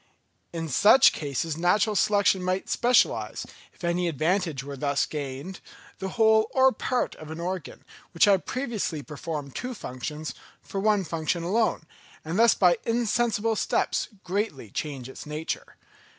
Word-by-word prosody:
In 165 -1 -4
such 215 - +6
cases 150 +2 -3
natural 190 +6 +2
selection 200 -1 +3
might 185 +1 -2
specialise, 245 +1 +2 0.3
if - - -20
any 175 +1 0
advantage 165 -1 0
were 140 0 -7
thus 140 +1 0
gained, 145 +5 -6 0.4
the 190 - -3
whole 220 -1 +4
or 265 0 +6
part 255 -1 -1
of 155 - -10
an 160 +1 -6
organ, 180 -2 -5 0.3
which 165 - +4
had 195 -3 +3
previously 225 - -3
performed 150 -2 -6
two 255 0 -4
functions, 150 - -6 0.3
for 195 - -5
one 210 -1 +2
function 165 +1 -2
alone, 215 +1 +1 0.4
and 165 +6 -2
thus 230 -1 +6
by 180 -3 +4
insensible 230 -1 +1
steps - - 0 0.2
greatly 180 - -3
change 135 -2 -4
its 130 - -10
nature. 150 +2 -5
180 Hz, 145 wpm, -26 LUFS, 150-215 Hz, 0.4 s, such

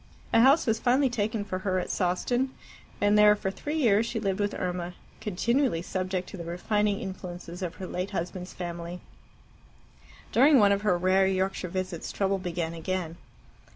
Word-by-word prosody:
A 230 - +6
house 275 +6 +6
was 225 -2 +1
finally 260 +1 +3
taken 220 -2 -1
for 185 -2 -3
her 185 -1 -1
at 180 - -2
Sawston, 240 +8 0 0.5
and 205 +1 +3
there 210 0 +7
for 195 -2 -3
three 295 +10 -5
years 225 -7 +4
she 230 - -2
lived 195 -2 -1
with 205 0 0
Irma, 180 -1 -3 0.2
continually 220 - 0
subject 185 0 -2
to - - -8
the 170 - -6
refining 200 +4 0
influences 180 -2 -7
of 180 -1 -4
her 190 - -6
late 180 +2 -3
husband's 180 -1 -4
family. 175 0 -6 1.3
During 275 +4 +6
one 205 -4 +6
of 200 0 +2
her 205 -4 +2
rare 190 +2 +3
Yorkshire 190 -1 -1
visits 185 -2 -4
trouble 195 -1 0
began 170 -2 -3
again. 170 0 -3
190 Hz, 170 wpm, -28 LUFS, 180-210 Hz, 1.3 s, there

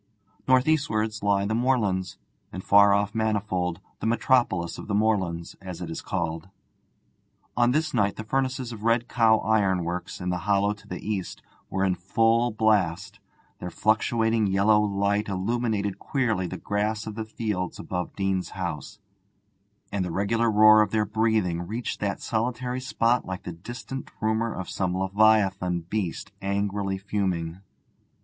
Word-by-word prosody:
North 130 +1 +4
eastwards 110 -8 0
lie 100 -1 +2
the 105 - -1
moorlands, 105 -7 0 0.3
and 95 - -6
far 100 0 +6
off 100 +1 +1
Manifold, 105 -6 -1 0.2
the - - -2
'metropolis 115 -8 +1
of - - -8
the 100 - -1
moorlands,' 95 -6 0
as 90 -3 -7
it 85 -2 -5
is - - -5
called. 85 -2 -3 1.1
On 120 0 +3
this 150 +3 0
night 100 -4 +1
the 110 - -6
furnaces 130 +1 -1
of 110 -2 -8
Red 115 +1 +2
Cow 115 -2 +4
Ironworks, 95 -5 0
in 90 - -3
the 90 - -1
hollow 100 +2 +1
to 105 - -18
the - - -7
east, 100 -4 -3 0.3
were 95 0 -1
in 95 - +2
full 115 +6 +2
blast; 100 -3 +1 0.4
their 90 - -5
fluctuating 110 +2 +1
yellow 100 +2 +4
light 100 0 0
illuminated 105 0 -1
queerly 115 - 0
the - - -6
grass 105 +1 -2
of 110 - -5
the 110 +1 -4
fields 105 -5 -3
above 90 -1 -4
Deane's 95 -2 -1
house, 85 -6 -4 0.9
and 100 -2 -1
the 90 - -3
regular 110 +6 +1
roar 110 0 +7
of 105 - +2
their 110 0 +1
breathing 105 -5 0
reached 115 +4 -4
that 100 -1 -2
solitary 125 +2 -2
spot 120 -1 +1
like 95 -1 -5
the - - -5
distant 120 +8 -7
rumour 110 +1 0
of 95 - -5
some 90 -1 -2
leviathan 95 -2 +2
beast 90 +1 -4
angrily 100 0 -1
fuming. 95 -4 -2
105 Hz, 155 wpm, -26 LUFS, 95-110 Hz, 1.1 s, roar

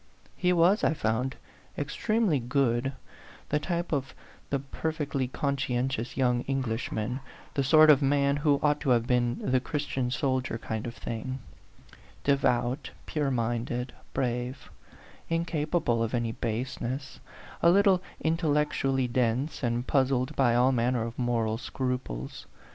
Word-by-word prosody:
He 180 -1 +2
was, 180 +4 +4
I - - +3
found, 125 +1 -1 0.4
extremely 195 - +1
good 125 0 +1 0.6
the 150 - +2
type 170 +2 -2
of 135 -4 -2 0.3
the 140 - +1
perfectly 140 -1 -2
conscientious 130 -3 -1
young 125 -2 +2
English 130 -4 -1
man, 115 +5 -2 0.3
the 140 - +1
sort 155 +3 +7
of 145 -1 +5
man 140 0 +3
who 145 -1 +3
ought 150 -1 +3
to 140 - -1
have 120 -2 +4
been 120 -1 +1
the 130 - +4
Christian 135 -2 -2
soldier 130 -2 0
kind 110 0 -4
of 115 - -6
thing: 125 +3 -4 0.9
devout, 130 -1 +1 0.2
pure 150 -3 -1
minded, 120 0 -1 0.2
brave, 125 +1 -3 0.6
incapable 160 -6 0
of 115 +2 0
any 120 -1 0
base 115 +3 -3
ness, 130 +3 -4 0.4
a 170 - +6
little 195 0 +5 0.2
intellectually 150 -5 +1
dense, 125 +4 0
and 120 -1 0
puzzled 130 -2 +1
by 120 -3 +3
all 125 +2 +4
manner 120 -1 +1
of 115 +1 -6
moral 115 -2 0
scruples. 125 - -4
130 Hz, 135 wpm, -28 LUFS, 120-145 Hz, 0.9 s, sort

